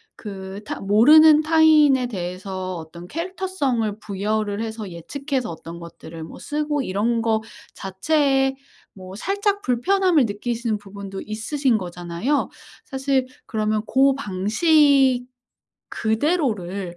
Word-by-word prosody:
그 195 -1 -8
타 - - -5
모르는 295 +10 +7
타인에 310 -4 +5
대해서 185 -2 -5
어떤 170 +2 -10
캐릭터성을 300 - -2
부여를 205 +1 -2
해서 220 -3 -5
예측해서 260 - -4
어떤 165 +1 -9
것들을 165 -1 -10
뭐 - - -10
쓰고 295 -1 -2
이런 225 +4 0
거 220 -1 +1 0.3
자체에 270 +7 +1 0.4
뭐 185 0 -11
살짝 405 - -1
불편함을 335 +4 +2
느끼시는 225 +1 -2
부분도 200 -1 -8
있으신 230 +3 0
거잖아요. 175 +8 -2 0.3
사실 270 -1 -1 0.2
그러면 215 -1 -1
고 270 +4 +3
방식 265 - +3 0.7
그대로를 215 - -1
225 Hz, 260 characters per minute, -22 LUFS, 195-285 Hz, 0.7 s, 모르는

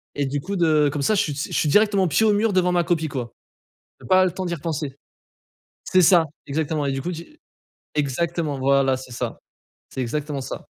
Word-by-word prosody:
et 145 - 0
du 135 +1 -2
coup 200 +5 -4
de 155 -4 +3
comme 145 -1 -3
ça 215 - +2
je 195 - +3
suis - - -5
je 145 - -4
suis 150 - +1
directement 205 +1 +3
pied 170 +8 +2
au 215 - +4
mur 210 +1 +2
devant 180 -1 +2
ma 175 - +2
copie 160 -2 0
quoi. 125 -5 -5 0.7
Tu - - -14
as - - -10
pas 185 0 +6
le 180 - 0
temps 185 +1 -5
d'y 175 - -2
repenser. 150 -3 -4 0.9
C'est 185 - +3
ça, 175 0 +6 0.2
exactement 150 0 -1
et 135 - 0
du 135 - -3
coup 175 - -3
tu 170 - -10 0.6
exactement! 150 +1 -1
Voilà 135 0 +3
c'est 130 -1 -10
ça, - - -4 0.5
c'est 130 - -3
exactement 145 +3 -3
ça. 130 - -7
155 Hz, 215 wpm, -23 LUFS, 140-180 Hz, 0.9 s, pas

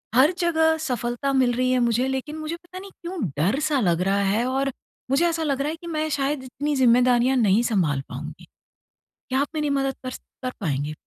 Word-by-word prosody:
हर 280 +7 +6
जगह 320 -2 +3
सफलता 250 -1 -2
मिल 255 -2 +3
रही 255 +1 +1
है 255 - +3
मुझे 240 +2 +2
लेकिन 265 +4 -3
मुझे 310 +1 -4
पता 350 +2 -11
नहीं 395 0 -11
क्यों 355 +1 -5 0.2
डर-सा 275 - +1
लग 175 -3 +2
रहा 200 - +2
है 210 +5 +1
और 270 +1 0 0.4
मुझे 275 +6 +3
ऐसा 330 -1 -1
लग 275 -2 0
रहा 290 - 0
है 315 - -3
कि 340 - -9
मैं 310 -1 -1
शायद 280 -1 -1
इतनी 290 +3 -3
जिम्मेदारियाँ 250 0 +4
नहीं 215 -1 +4
सँभाल 170 - +1
पाऊँगी। - - -8 0.8
क्या 260 - +1
आप 290 - 0
मेरी 300 -1 0
मदद 270 -1 0
कर 255 - -3
स - - -8 0.2
कर 255 - -1
पाएँगे? 145 -3 -1
265 Hz, 205 wpm, -24 LUFS, 240-305 Hz, 0.8 s, हर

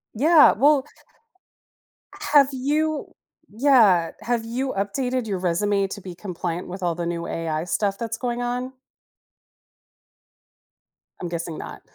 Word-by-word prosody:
Yeah, 305 +6 +6
well 280 +3 +3 1.5
Have 280 -2 +7
you 295 +4 -1 0.4
Yeah, 215 - +4
have 235 -1 -1
you 260 +3 -3
updated 245 +5 -2
your 195 -3 -2
resume 195 +3 +1
to 200 - -8
be 180 -2 -9
compliant 175 -2 -5
with 185 +1 -7
all 170 -1 0
the 170 0 -3
new 170 0 -3
AI 160 -1 -3
stuff 195 +2 -1
that's 230 -1 -4
going 245 -1 -3
on? 250 +2 -3 2.5
I'm 175 - -3
guessing 170 -1 -5
not. - - -8
210 Hz, 125 wpm, -23 LUFS, 180-255 Hz, 2.5 s, Have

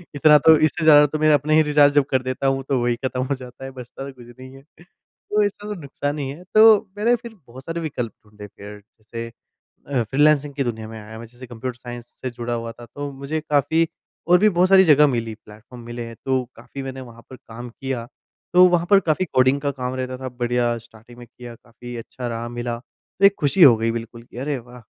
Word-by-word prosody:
इतना 150 +1 +6
तो 160 -1 +9
इससे 155 +1 0
ज़्यादा 150 -2 +7
तो 155 +2 -4
मैं 155 0 +4
अपने 150 +2 +2
ही 155 - +6
रिचार्ज 145 -1 +4
जब 145 -2 +3
कर 130 - +2
देता 130 +1 -2
हूँ 135 0 0
तो 135 - +1
वही 120 0 +1
ख़त्म 130 0 -2
हो 140 - -1
जाता 130 0 -11
है 135 - -7
बचता 130 +1 -9
तो 140 - -9
कुछ 125 -2 -15
नहीं 130 0 -11
है। 135 - -15 0.2
तो 210 +3 -4
इससे 205 +1 -3
तो 210 - -3
नुकसान 145 +1 -4
ही 135 -2 -3
है। 155 +6 -9
तो 215 -1 +6
मैंने 230 +4 +3
फिर 235 -1 -10
बहुत 130 +3 -12
सारे 165 0 -4
विकल्प 125 -7 -4
ढूँढ़ने 105 0 -12
फिर 105 +1 -12
जैसे 110 +2 -10 0.6
अ, 135 -4 0
फ्रीलांसिंग 145 +4 +2
की 140 - 0
दुनिया 110 -3 -4
में 110 0 -9
आया 110 +1 -10
मै 115 - -9
जैसे 120 +2 -13
कंप्यूटर 120 +1 -6
साइंस 120 -1 -9 0.2
से 130 - -2
जुड़ा 120 0 -5
हुआ 115 0 -4
था 120 +1 -13
तो 145 0 -5
मुझे 140 +3 -4
काफ़ी 155 +2 +1 0.4
और 175 +1 +5
भी 215 +2 +5
बहुत 180 0 +2
सारी 190 -1 +7
जगह 150 -2 +6
मिली, 115 -4 -2
प्लेटफार्म 110 +3 -15
मिले। 120 0 -7
तो 130 +2 -1
काफ़ी 140 - -9
मैंने 135 0 -7
वहाँ 115 -2 -13
पर 130 - -10
काम 120 +2 -10
किया 125 -1 -5 0.5
तो 180 +1 +8
वहाँ 175 -1 +1
पर 200 -1 +7
काफ़ी 170 0 0
कोडिंग 130 +2 +3
का 145 - -1
काम 130 -2 -5
रहता 130 0 -4
था 130 0 -6
बढ़िया 120 -1 -1
स्टार्टिंग 115 +1 -17
में 120 - -12
किया 120 0 -12
काफ़ी 120 +1 -12
अच्छा 120 +2 -7
रहा 115 0 -4
मिला 120 0 -4
तो 185 +9 -3
एक 200 0 +6
खुशी 155 +5 +3
हो 130 -6 +9
गई 115 +1 0
बिल्कुल 115 0 -7
कि 120 - -16
अरे 140 +2 -2
वाह! 125 +1 -14
130 Hz, 235 wpm, -22 LUFS, 120-150 Hz, 0.6 s, तो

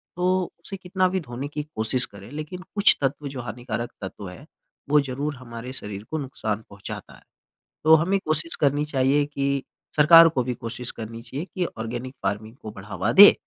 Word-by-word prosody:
तो 180 0 +1
उसे 195 - -6
कितना 185 0 +1
भी 190 +1 0
धोने 130 -3 -5
की 150 +1 -4
कोशिश 125 -3 0
करें, 100 +1 -13
लेकिन 155 +5 -6
कुछ 205 -1 +5
तत्व 140 +2 -1
जो 135 -2 -5
हानिकारक 120 +1 -4
तत्व 95 0 -6
हैं, 110 +11 -11 0.4
वो 150 +1 +6
ज़रूर 140 +2 -3
हमारे 125 -1 -8
शरीर 105 -5 -6
को 160 - 0
नुकसान 115 -7 -3
पहुँचाता 100 -1 -8
है। - - -18 0.6
तो 160 +1 +8
हमें 180 +5 +2
कोशिश 155 +2 +1
करनी 145 0 +3
चाहिए 140 0 +2
कि 140 -1 -1 0.3
सरकार 165 +2 +9
को 155 -6 0
भी 125 0 -2
कोशिश 115 +1 -5
करनी 115 +1 -7
चाहिए 135 +8 -5
कि 185 - 0
ऑर्गेनिक 120 +3 -4
फ़ार्मिंग 110 +4 -2
को 110 - -8
बढ़ावा 100 +1 -3
दें 205 +7 +11
135 Hz, 185 wpm, -25 LUFS, 115-155 Hz, 0.6 s, दें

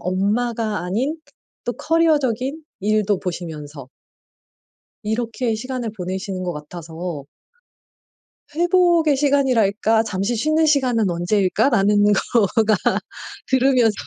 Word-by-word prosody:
엄마가 215 +4 -1
아닌 250 - -1 0.5
또 240 - -1
커리어적인 295 -3 +1 0.2
일도 210 -1 +1
보시면서 155 -6 -6 1.2
이렇게 225 +1 -2
시간을 250 -1 -4
보내시는 185 0 -4
것 175 - -2
같아서 160 0 -7 1.3
'회복의 345 -3 +3
시간이랄까 230 -6 +2
잠시 200 +3 -2
쉬는 310 +6 +2
시간은 250 -9 +2
언제일까?'라는 200 +4 +2 0.5
거가 220 -1 +4 0.7
들으면서 255 -4 +3
220 Hz, 245 characters per minute, -21 LUFS, 190-265 Hz, 1.3 s, 거가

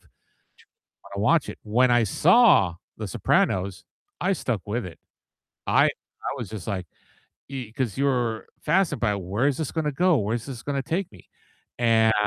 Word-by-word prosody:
to - - -28 1.1
wanna 100 - -1
watch 155 +5 +3
it. - - -7
When 120 +4 +3
I 120 -2 +4
saw 150 - +5 0.2
The - - -5
Sopranos, 95 0 0 0.4
I 195 - +2
stuck 120 - -2
with 110 +1 -2
it. 85 - -10 0.7
I - - +5
I - - -5
was 115 -6 -6
just 110 -4 -7
like, 95 -4 -3 0.6
e 130 -5 -6
'cause 120 -4 -3
you're 125 -5 0
fascinated 155 -4 +1
by 105 -3 +2
where 100 +7 -1
is 140 -2 0
this 160 -4 -3
gonna 155 -2 -1
go, 175 +2 +3
where 105 +1 0
is 115 - -5
this 125 -5 -7
gonna 140 -1 -1
take 170 +5 -2
me? 95 -5 -17 0.5
And 110 -2 +4
120 Hz, 170 wpm, -25 LUFS, 105-145 Hz, 1.1 s, saw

